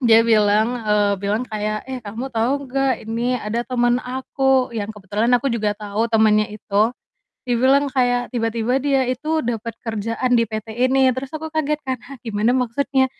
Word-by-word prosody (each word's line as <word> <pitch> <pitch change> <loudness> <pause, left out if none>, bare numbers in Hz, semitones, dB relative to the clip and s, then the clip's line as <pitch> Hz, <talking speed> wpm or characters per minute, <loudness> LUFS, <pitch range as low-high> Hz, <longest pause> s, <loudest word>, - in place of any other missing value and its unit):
Dia 230 -3 +6
bilang, 220 +1 +3
eee, 210 -1 +3
bilang 205 +4 -1
kayak, 215 -3 -3
"Eh 260 - -3
kamu 230 +6 -5
tahu 260 +4 -1
nggak 270 0 0
ini 235 +2 0
ada 235 0 -2
teman 240 -1 +2
aku?" 260 +1 0
Yang 220 -2 -4
kebetulan 210 +3 -1
aku 245 +3 +3
juga 215 -3 0
tahu 210 +2 -2
temannya 215 -2 +3
itu, 210 +2 0 0.5
dia 245 -1 +1
bilang 275 +2 +4
kayak 245 -1 +1
tiba-tiba 235 +2 0
dia 275 -1 +2
itu 305 +4 -1
dapat 230 -1 -3
kerjaan 230 +3 -1
di 230 -2 +3
PT 215 0 -5 0.2
ini 265 -1 +4
terus 260 +2 -5
aku 315 +1 -6
kaget 300 -1 0
kan, 260 -1 -1
"Hah 275 +1 -11
gimana 225 +3 +1
maksudnya?" 265 +2 +1
240 Hz, 175 wpm, -21 LUFS, 215-260 Hz, 0.5 s, Dia